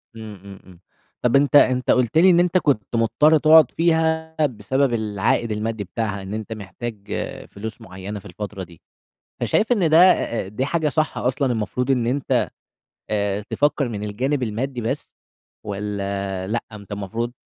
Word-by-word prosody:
إمم، 110 -2 -8
إمم، 100 -1 -11
إمم. 90 -2 -16 0.4
طَب 125 +2 +2
أنت 145 +1 +3
أنت 130 -3 +5
قُلت 125 +3 +2
لي 185 +3 +7
إن 175 -1 +5
أنت 180 +1 +3
كنت 120 - 0
مُضطر 150 +7 +4
تقعُد 155 -2 +6
فيها 160 -1 +1
بسبب 130 +2 0
العائد 110 +1 0
المادّي 105 0 -2
بتاعها 100 +1 -3
إن 95 +2 -7
أنت 110 0 -4
محتاج 110 +3 -7 0.6
فلوس 110 +3 -7
معيّنة 100 0 -7
في - - -18
الفترة 100 +1 -6
دي. 85 -2 -15 0.6
فشايف 225 +3 +1
إن 180 -9 +2
ده، 160 - +5 0.2
آآ، 110 -5 -3
دي 115 +6 -2
حاجة 160 -1 0
صح 155 +2 -1
أصلًا 130 0 0
المفروض 125 +4 -2
إن 125 -3 +2
أنت 135 +3 0 0.6
آآ 100 -1 0
تفكّر 145 -2 +1
من 105 -2 -5
الجانب 130 +7 -1
المادّي 120 +3 -3
بس 115 - -4 0.5
والّا 100 -2 -3
لأ، 120 +2 -2
أنت 100 -1 -10
المفروض 115 +4 -3
115 Hz, 160 wpm, -22 LUFS, 105-140 Hz, 0.6 s, لي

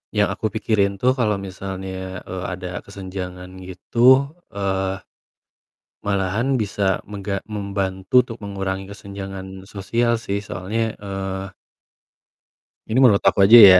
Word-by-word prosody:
yang 105 0 +3
aku 110 - -1
pikirin 100 -2 +1
tuh 125 +6 +3
kalo 115 -5 +1
misalnya, 95 -1 -5
eee, 95 0 -5
ada 90 -1 -4
kesenjangan 95 -2 -7
gitu, 120 +9 +4 0.2
eee, 95 -1 -1 1.0
malahan 100 +7 +1
bisa 100 -4 0
mengga 100 -1 -4
membantu 100 +2 +1
untuk 115 -1 -9
mengurangi 95 -1 -3
kesenjangan 95 -1 -8
sosial 115 +4 +1
sih. 100 -3 -2
Soalnya, 105 +4 -2
eee 95 -1 -4 1.4
ini 110 - 0
menurut 105 -6 +7
aku 100 - +5
aja 115 +4 +10
ya, 95 -4 +11
100 Hz, 115 wpm, -22 LUFS, 95-105 Hz, 1.4 s, ya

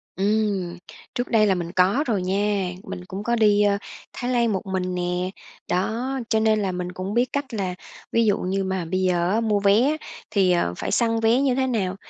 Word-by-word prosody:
Ừm, 200 -3 0 0.4
trước 245 -1 -1
đây 215 -3 +4
là 195 - +3
mình 170 -1 -4
có 190 +10 +3
rồi 210 -6 +1
nha, 195 0 0
mình 90 -1 -7
cũng 195 - -6
có 235 +2 +1
đi, 210 -2 +4
ơ, 200 -1 +3 0.4
Thái 245 +1 -3
Lan 235 -2 +2
một 190 - -3
mình 185 -1 -2
nè. 180 +1 -1 0.4
Đó, 220 +8 -1 0.2
cho 220 - +3
nên 220 -1 +3
là 195 -2 0
mình 180 0 -4
cũng 185 +2 -5
biết 245 +2 +2
cách 280 -3 -3
là 190 -4 -2 0.4
ví 230 0 +3
dụ 205 -2 +3
như 195 +1 -1
mà 190 -2 -2
bây 185 +3 -1
giờ, 180 +3 +1
mua 215 -3 +1
vé 200 +3 +4
á, 295 +4 +2 0.3
thì, 190 -3 +3
ờ, 170 - +1
phải - - -3
săn 230 -1 +2
vé 225 +3 +3
như 270 -3 +2
thế 265 0 +1
nào. 195 -7 -1
200 Hz, 220 wpm, -23 LUFS, 185-225 Hz, 0.4 s, đây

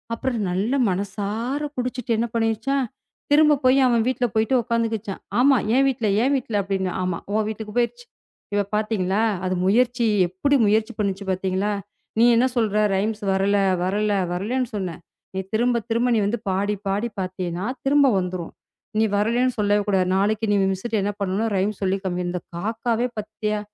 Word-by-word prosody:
அப்புறம் 245 0 -2
நல்லா 210 +9 0
மனசார 205 +8 -3 0.2
குடிச்சுட்டு, 250 -1 -2
என்ன 235 +2 0
பண்ணிடுச்சாம்? 230 +4 0 0.5
திரும்பப் 295 -1 +5
போய் 255 +2 +5
அவன் 235 -2 +3
வீட்டுல 250 -1 0
போயிட்டு 220 +4 +2
உக்காந்துக்குச்சாம்." 225 -4 -2 0.2
"ஆமா. 270 +1 +5 0.2
என் 270 +1 +4
வீட்டுல, 235 -5 -1
என் 275 +2 +2
வீட்டுல" 225 -6 -1
அப்படின்னுவான். 190 -2 -2
ஆமா. 180 -2 -2
உன் 215 0 +1
வீட்டுக்குப் 215 +1 -6
போயிருச்சு. 475 - -2 0.5
இப்ப 205 0 +1
பாத்தீங்களா? 210 -2 0 0.2
அது 185 0 0
முயற்சி 240 +3 +2 0.2
எப்படி 190 +11 +1
முயற்சி 220 +2 +2
பண்ணுச்சு 200 -1 -1
பாத்தீங்களா? 190 +2 -1 0.5
நீ - - +6
என்ன 245 +3 +4
சொல்ற? 215 -3 +1 0.2
ரைம்ஸ் 210 +2 -1
வரல, 200 +1 +2 0.3
வரல, 205 +3 0 0.2
வரலைன்னு 240 +7 -1
சொன்ன. 185 -5 -3 0.4
நீ 190 - -2
திரும்பத் 235 0 +1
திரும்ப 235 +2 +1
நீ 220 - +3
வந்து 230 +3 -1
பாடிப் 200 +2 -1
பாடி 205 +5 -1
பாத்தீன்னா, 185 0 -4 0.2
திரும்ப 285 0 +5
வந்துரும். 180 -2 -4 0.5
நீ - - +4
வரலைன்னு 240 +4 +1
சொல்லவே 205 0 +3
கூடாது. 190 -2 +2
நாளைக்கு 215 +3 +1
நீ 205 - +3 0.2
மிஸ்ட்ட 215 +3 -2
என்ன 205 - 0
பண்ணனும்? 200 +4 0
ரைம்ஸ் 200 +2 -1
சொல்லிக் 190 +1 0
காமிக்கணும். 180 -1 -2
இந்தக் 180 -1 -6
காக்காவே 225 +4 -1
பாத்தியா? 215 0 -3
215 Hz, 160 wpm, -23 LUFS, 195-240 Hz, 0.5 s, நீ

